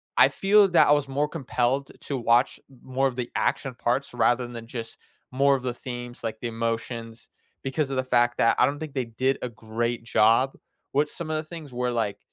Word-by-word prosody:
I - - +7
feel 200 +1 +4
that 175 - +6
I - - +5
was 145 -1 +3
more 145 +2 0
compelled 135 -3 -1
to 140 - -4
watch 120 +1 +2 0.2
more 135 +1 +1
of 125 - -4
the 125 -1 -4
action 135 -2 0
parts 125 +3 -1
rather 120 +1 +2
than 115 -1 -8
just 115 -1 -6 0.4
more 140 +2 +4
of 130 - -5
the 125 -1 -1
themes, 120 -1 -7
like 110 -1 -4
the 120 - -3
emotions, 115 0 -4 0.3
because 135 +2 -1
of 135 - -2
the 130 - +1
fact 120 -1 +2
that 115 - +4
I - - +6
don't 145 - -2
think 155 -3 -6
they 130 -3 -1
did 130 +4 -1
a 125 - -3
great 115 +1 -3
job 115 +3 +3 0.4
with 145 +2 +2
some 160 -2 -5
of 155 - 0
the - - -1
things 155 -4 -9
where, 125 0 -1
like, 110 -4 -1
125 Hz, 215 wpm, -26 LUFS, 115-140 Hz, 0.4 s, I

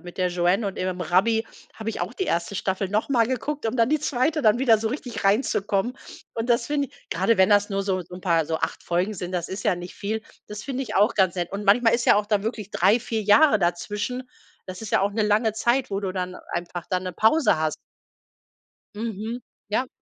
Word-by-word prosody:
mit 175 +1 -10
der 185 - +2
Joanne 180 +4 +1
und 195 - -4
ihrem 185 0 -2
Rabbi 195 +7 +2 0.3
habe 220 0 -4
ich - - -6
auch 180 +6 -3
die 380 - -2
1. 170 +4 -1
Staffel 190 0 -1
noch 210 +5 0
mal 235 -4 +3
geguckt, 280 +3 -3
um 225 +2 -1
dann 230 0 +3
die 310 0 +1
2. 295 +3 0
dann 220 +1 +4
wieder 235 -4 +4
so 220 +1 -1
richtig 245 -3 -5
reinzukommen. 205 +2 +1 0.4
Und 230 +2 -2
das 235 0 +2
finde 285 -3 -1
i - - -31 0.2
grade 190 +6 +2
wenn 190 +2 +5
das 205 0 +4
nur 195 0 -1
so 190 -2 0
so 180 - -12
'n - - -10
paar 165 -4 +1
so 160 - -1
8 160 - -3
Folgen 180 +5 -1
sind, 180 -1 -5
das 175 -2 -3
ist 195 +3 -5
ja 180 - +2
nicht 175 0 -8
viel 220 +2 -3 0.3
das 210 0 -7
finde 270 -1 -3
ich 260 - -4
auch 210 +4 +4
ganz 190 -3 +2
nett. 175 +1 -3
Und 200 +1 -4
manchmal 225 +3 +4
ist 235 - 0
ja - - +6
auch 210 - 0
da 210 -2 +1
wirklich 215 -2 -4
3, 195 +6 +4
4 225 -2 -3
Jahre 215 +2 +5
dazwischen. 210 +8 -2 0.4
Das 185 +3 -8
ist 220 - -6
ja - - +3
auch 200 - 0
'ne 215 +1 0
lange 215 +1 +2
Zeit, 240 +4 +1
wo 195 0 -1
du 195 -2 -2
dann 185 -1 -4 0.2
einfach 175 0 -4
dann 185 0 0
'ne 185 - -4
Pause 220 - +3
hast. 155 0 -1 1.2
Mhm. 225 +2 -4 0.3
Ja. 235 +5 0
210 Hz, 235 wpm, -24 LUFS, 185-230 Hz, 1.2 s, ja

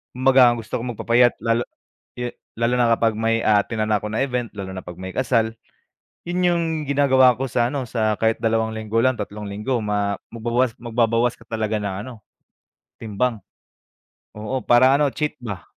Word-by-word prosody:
kumbaga 130 -1 +5
ang 120 0 +2
gusto 110 - -4
ko - - -6
magpapayat, 120 +2 +3
lalo 115 +1 +1 0.5
e 125 0 -4 0.2
lalo 115 +2 0
na 120 - +4
kapag 115 -1 +1
may 115 0 +1
a-attenan 110 +1 +1
ako 105 0 0
na 110 +5 0
event 125 -3 -2
lalo 95 -2 -6
na 95 0 -7
pag 90 - -8
may 95 +1 -7
kasal, 115 -1 +1 0.7
yun 175 +1 -2
yung 170 -1 +1 0.3
ginagawa 130 -3 +4
ko 135 - -3
sa 120 -2 0
ano 135 0 -3
sa 110 -3 -1
kahit 110 +1 0
2 110 0 0
linggo 110 0 -3
lang, 130 -1 +1
3 105 +1 -6
linggo 105 +6 -2
ma 105 -1 -1 0.2
magbawas, 120 +1 0
magbabawas 115 0 +1
ka - - -19
talaga 110 -1 -2
ng 100 -2 -3
ano, - - -8 0.8
timbang. 115 +2 -2 1.0
Oo, 110 +5 -3
para 130 +3 +5
ano, 145 0 +3
cheat 150 +2 -2
ba. 100 -7 -6
115 Hz, 175 wpm, -22 LUFS, 110-125 Hz, 1.0 s, kumbaga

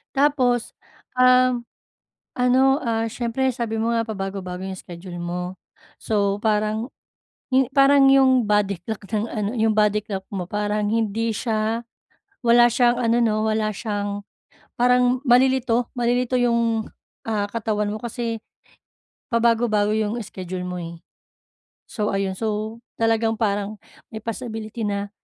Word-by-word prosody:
Tapos, 265 -4 +2 0.4
um, 255 -1 +5 0.7
ano, 260 +2 +3
ah, 225 -2 0
siyempre, 240 +3 -1
sabi 230 -2 -3
mo 230 +1 +1
nga, 230 0 +1
pabago-bago 195 -3 -5
yung 190 -1 -5
schedule 175 0 -9
mo. 180 +1 -4 0.5
So, 200 -2 0
parang 215 +2 0 0.6
ih 265 0 +5
parang 275 0 +6
yung 260 -3 +5
body 205 -2 +1
clock 220 -2 -5
ng 215 0 0
ano, 210 -3 -2
yung 220 0 +2
body 210 0 +3
clock 195 -3 -4
mo, 185 -2 -3
parang 210 0 -1
hindi 225 +1 0
siya 220 0 -1 0.6
wala 240 0 +6
siyang 240 0 +3
ano, 235 -1 +2
'no, 215 -1 +1
wala 215 0 0
siyang 205 -1 -3 0.5
parang 250 +1 +3
malilito, 250 -1 +3
malilito 245 +1 +1
yung, 235 -2 +1 0.4
ah, 210 -2 0
katawan 210 -1 -1
mo 215 - -3
kasi 235 -1 -3 0.9
pabago-bago 230 -3 +2
yung 220 +1 -1
schedule 185 -2 -6
mo, 180 0 -4
eh. 170 0 -8 0.9
So, 210 -2 -2
ayun. 195 -1 -1
So, 215 0 -3 0.2
talagang 225 0 +2
parang 205 -1 -1 0.4
may 220 - -5
possibility 225 -1 -5
na, 200 0 -2
225 Hz, 130 wpm, -23 LUFS, 205-240 Hz, 0.9 s, parang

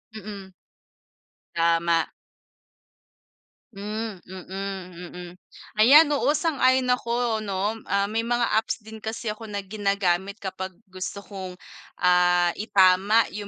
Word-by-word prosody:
Mm. 200 -3 -9 1.0
Tama. 165 0 +2 1.6
Hmm, 210 0 -5
mm, 185 -1 -7
mm. 180 0 -8 0.5
Ayan, 290 +7 +8
oo 290 - +1
sang-ayon 260 -6 +2
ako 235 -2 0
'no. 205 +1 -2
Ah, 200 0 +2
may 215 +3 -1
mga 240 +1 0 0.2
apps 220 0 -4
din 220 +1 -10
kasi 225 +1 -4
ako 220 +1 -9
na 205 -1 -4
ginagamit 200 -2 0
kapag 190 -1 -5 0.2
gusto 185 +2 -6
kong, 190 -3 -8 0.4
ah, 180 -1 +4
itama 200 +1 +4
'yung 205 0 -6
200 Hz, 110 wpm, -25 LUFS, 185-220 Hz, 1.6 s, Ayan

